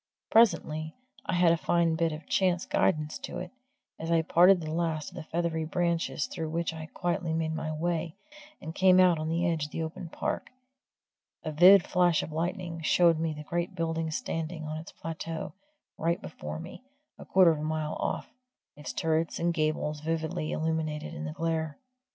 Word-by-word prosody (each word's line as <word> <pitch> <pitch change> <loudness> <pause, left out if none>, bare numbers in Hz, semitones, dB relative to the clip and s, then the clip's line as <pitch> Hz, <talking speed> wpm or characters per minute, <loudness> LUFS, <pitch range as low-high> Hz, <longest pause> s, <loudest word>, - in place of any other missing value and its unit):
Presently 160 -8 +3 0.3
I - - -1
had 175 -1 +5
a 170 - +3
fine 170 0 +2
bit 165 0 +1
of 155 0 -7
chance 180 -2 +1
guidance 155 -1 0
to - - -6
it 180 - -6 0.5
as 165 - -4
I 165 -1 +3
parted 180 +3 +6
the 155 -2 -5
last 160 -3 -1
of - - -15
the 175 - -5
feathery 160 0 -2
branches 170 -2 0
through 160 -3 -5
which 165 +1 -1
I 160 - -8
had 160 0 -9
quietly 175 -1 -1
made 160 0 -1
my 160 0 -3
way, 165 +1 -2 0.4
and 160 - -7
came 185 0 +5
out 180 -3 +5
on 155 0 -2
the 170 +2 0
edge 160 -3 0
of 145 - -10
the 165 - -3
open 160 +2 -6
park, - - -3 0.9
a 155 - -3
vivid 180 +5 +7
flash 175 -3 +3
of - - -7
lightning 170 +1 -3
showed 165 0 +4
me 160 -1 -1
the 150 - -7
great 175 +4 -3
building 165 -1 -1
standing 160 +1 -3
on 155 +1 -4
its 160 - -10
plateau 165 0 -5 0.5
right 170 +2 +1
before 160 - -7
me, 170 +9 -9 0.4
a - - -8
quarter 185 -3 +6
of 155 - -2
a - - -4
mile 155 0 -2
off, - - -3 0.4
its 145 0 -7
turrets 160 0 0
and 170 0 +1
gables 155 -1 -1
vividly 160 0 -2
illuminated 160 -1 -2
in 160 -1 -5
the 155 - -4
glare. 160 -2 -2
165 Hz, 190 wpm, -29 LUFS, 155-170 Hz, 0.9 s, vivid